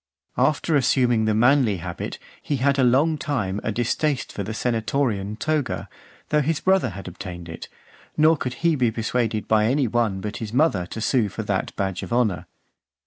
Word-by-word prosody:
After 150 Hz, +4 st, +2 dB
assuming 120 Hz, -4 st, +3 dB
the 110 Hz, -1 st, +1 dB
manly 120 Hz, -2 st, +4 dB
habit, 80 Hz, -, -5 dB, 0.2 s
he 145 Hz, -, -2 dB
had 140 Hz, +1 st, +1 dB
a -, -, +4 dB
long 145 Hz, +6 st, +3 dB
time 105 Hz, -10 st, -2 dB
a -, -, -1 dB
distaste 125 Hz, +5 st, -1 dB
for -, -, -4 dB
the 100 Hz, +2 st, -4 dB
senatorian 110 Hz, -2 st, -1 dB
toga, 150 Hz, 0 st, -1 dB, 0.4 s
though 150 Hz, -, +3 dB
his 150 Hz, +2 st, 0 dB
brother 190 Hz, -8 st, +2 dB
had 95 Hz, 0 st, -9 dB
obtained 90 Hz, -1 st, -8 dB
it; 80 Hz, -, -8 dB, 0.5 s
nor 155 Hz, +1 st, +5 dB
could 125 Hz, -4 st, -4 dB
he 165 Hz, -2 st, +4 dB
be 125 Hz, -4 st, +2 dB
persuaded 115 Hz, -1 st, -1 dB
by 110 Hz, -1 st, +3 dB
any 130 Hz, +3 st, +2 dB
one 110 Hz, -4 st, 0 dB
but 105 Hz, +2 st, -5 dB
his 110 Hz, -1 st, -6 dB
mother 125 Hz, -, +2 dB
to 110 Hz, -, -6 dB
sue 115 Hz, -2 st, +2 dB
for 110 Hz, -, -5 dB
that 100 Hz, -3 st, -2 dB
badge 95 Hz, -2 st, -2 dB
of -, -, -7 dB
honour. 115 Hz, -6 st, +1 dB
120 Hz, 185 wpm, -23 LUFS, 105-140 Hz, 0.5 s, nor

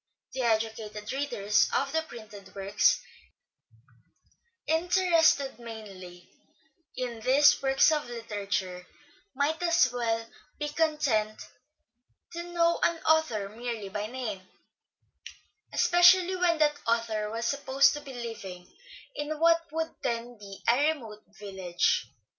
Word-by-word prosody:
The 260 Hz, -, -3 dB
educated 220 Hz, -1 st, -2 dB
readers 240 Hz, -7 st, +1 dB
of 275 Hz, +1 st, 0 dB
the 320 Hz, -, +1 dB
printed 210 Hz, -9 st, -12 dB
works, 195 Hz, 0 st, +2 dB, 1.6 s
interested 325 Hz, -5 st, +2 dB
mainly 195 Hz, -6 st, -10 dB, 0.7 s
in 245 Hz, -3 st, -4 dB
these 280 Hz, +6 st, +4 dB
works 270 Hz, +3 st, +4 dB
as 300 Hz, -5 st, -1 dB
literature, 200 Hz, -6 st, -4 dB, 0.5 s
might 295 Hz, +4 st, 0 dB, 0.3 s
well 230 Hz, -2 st, -1 dB, 0.3 s
be 295 Hz, 0 st, -3 dB
content 290 Hz, -9 st, 0 dB, 0.9 s
to 340 Hz, -, -4 dB
know 340 Hz, -1 st, +1 dB
an 340 Hz, -, +2 dB
author 315 Hz, -11 st, +2 dB
merely 225 Hz, -2 st, -5 dB
by 210 Hz, +2 st, -4 dB
name, 225 Hz, -5 st, -5 dB, 1.3 s
especially 355 Hz, +1 st, +5 dB
when 355 Hz, -2 st, +2 dB
that 295 Hz, -1 st, +2 dB
author 225 Hz, -2 st, 0 dB
was 230 Hz, +2 st, -4 dB
supposed 275 Hz, +1 st, +3 dB
to 295 Hz, -, -6 dB
be 275 Hz, -2 st, -10 dB
living 195 Hz, -7 st, -8 dB, 0.4 s
in 295 Hz, +1 st, -4 dB
what 330 Hz, 0 st, +3 dB
would 320 Hz, +1 st, -3 dB
then 235 Hz, +1 st, -3 dB
be 200 Hz, -1 st, -11 dB
a 285 Hz, +7 st, +4 dB
remote 220 Hz, -7 st, -12 dB
village. 190 Hz, -4 st, -1 dB
240 Hz, 115 wpm, -28 LUFS, 215-305 Hz, 1.6 s, especially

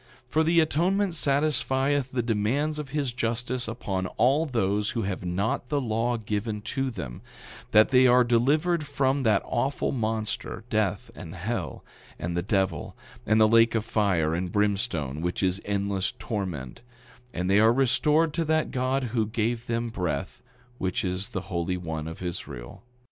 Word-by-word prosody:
9:26 -, -, -33 dB
For 160 Hz, -, +3 dB
the 170 Hz, +1 st, +4 dB
atonement 180 Hz, +5 st, +1 dB
satisfieth 140 Hz, -2 st, +1 dB
the 125 Hz, -2 st, -1 dB
demands 120 Hz, +8 st, 0 dB
of 145 Hz, -2 st, -6 dB
his 140 Hz, -3 st, -1 dB
justice 120 Hz, +1 st, -2 dB
upon 100 Hz, -5 st, -3 dB
all 140 Hz, +7 st, +3 dB
those 105 Hz, -5 st, 0 dB
who 115 Hz, -, 0 dB
have 95 Hz, -1 st, -3 dB
not 100 Hz, +7 st, -1 dB
the 145 Hz, -, +1 dB
law 120 Hz, -1 st, 0 dB
given 105 Hz, 0 st, -3 dB
to 135 Hz, +2 st, -2 dB
them, 65 Hz, -, -7 dB, 0.5 s
that 110 Hz, +1 st, +6 dB
they 130 Hz, -1 st, +6 dB
are 125 Hz, 0 st, +6 dB
delivered 150 Hz, +8 st, +2 dB
from 135 Hz, -1 st, +1 dB
that 110 Hz, -5 st, +3 dB
awful 135 Hz, +4 st, -1 dB
monster, 110 Hz, -3 st, -2 dB
death 105 Hz, -3 st, 0 dB
and 85 Hz, +3 st, -9 dB
hell, 105 Hz, +7 st, -4 dB, 0.3 s
and 85 Hz, +1 st, -3 dB
the 85 Hz, -, +1 dB
devil, 95 Hz, -5 st, -1 dB, 0.3 s
and 110 Hz, +1 st, +4 dB
the 110 Hz, -, +6 dB
lake 115 Hz, +1 st, +5 dB
of 110 Hz, -1 st, 0 dB
fire 95 Hz, -8 st, +1 dB
and 90 Hz, +1 st, -2 dB
brimstone, 100 Hz, -, 0 dB
which 90 Hz, +3 st, -2 dB
is 95 Hz, +1 st, +1 dB
endless 100 Hz, -1 st, -1 dB
torment; 90 Hz, -, -4 dB, 0.5 s
and 90 Hz, +1 st, -2 dB
they 100 Hz, +2 st, +4 dB
are 110 Hz, +1 st, +6 dB
restored 140 Hz, +5 st, +2 dB
to 170 Hz, -, 0 dB
that 160 Hz, 0 st, +1 dB
God 130 Hz, +1 st, 0 dB
who 110 Hz, -3 st, +1 dB
gave 115 Hz, +1 st, -2 dB
them 115 Hz, 0 st, -1 dB
breath, 90 Hz, -10 st, -3 dB, 0.4 s
which 95 Hz, +4 st, -1 dB
is 90 Hz, +2 st, -2 dB
the 95 Hz, -, -3 dB
Holy 90 Hz, -1 st, -2 dB
One 80 Hz, -3 st, -4 dB
of 80 Hz, +2 st, -7 dB
Israel. 70 Hz, -9 st, -6 dB
110 Hz, 165 wpm, -27 LUFS, 95-130 Hz, 0.5 s, that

